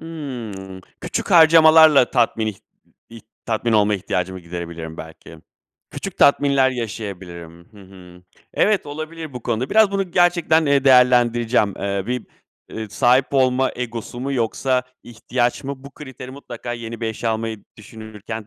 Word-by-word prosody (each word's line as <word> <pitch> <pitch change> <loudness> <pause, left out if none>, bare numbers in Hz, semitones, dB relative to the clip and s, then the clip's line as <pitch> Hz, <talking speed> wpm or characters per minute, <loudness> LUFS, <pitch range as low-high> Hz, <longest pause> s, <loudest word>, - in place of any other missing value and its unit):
Hımm. 120 -12 -8 0.2
Küçük - - -4
harcamalarla 160 -4 +6
tatmin 115 -2 +1
ih 105 - -4 0.5
ih 115 -1 -11 0.2
tatmin 115 +1 -1
olma 105 -1 +3
ihtiyacımı 95 -1 -3
giderebilirim 85 -2 -7
belki. 80 0 -12 0.5
Küçük - - -7
tatminler 140 -2 +4
yaşayabilirim. 95 -8 -7
Hı 105 - -16
hı, 90 -2 -16 0.3
evet 210 -5 +1
olabilir 155 +1 -7
bu 125 - -8
konuda; 120 +2 -2
biraz 220 -2 +4
bunu 195 -2 -2
gerçekten, 175 -3 +2
eee, 140 -1 +2
değerlendireceğim. 120 -4 +3
Eee, 100 0 -3
bir, 125 0 -4 0.4
eee, 110 -1 -7
sahip 125 +5 +2
olma 130 0 +2
egosu 120 0 -6
mu 140 +1 -3
yoksa 125 +1 0 0.2
ihtiyaç 120 +2 -3
mı? 135 0 -7
Bu 140 - -10
kriteri 130 -3 -10
mutlaka 120 -3 -8
yeni 115 -1 -7
bir 115 - -2
eşya 110 +1 -3
almayı 110 -1 -4
düşünürken 110 0 -9
120 Hz, 140 wpm, -20 LUFS, 105-140 Hz, 0.5 s, harcamalarla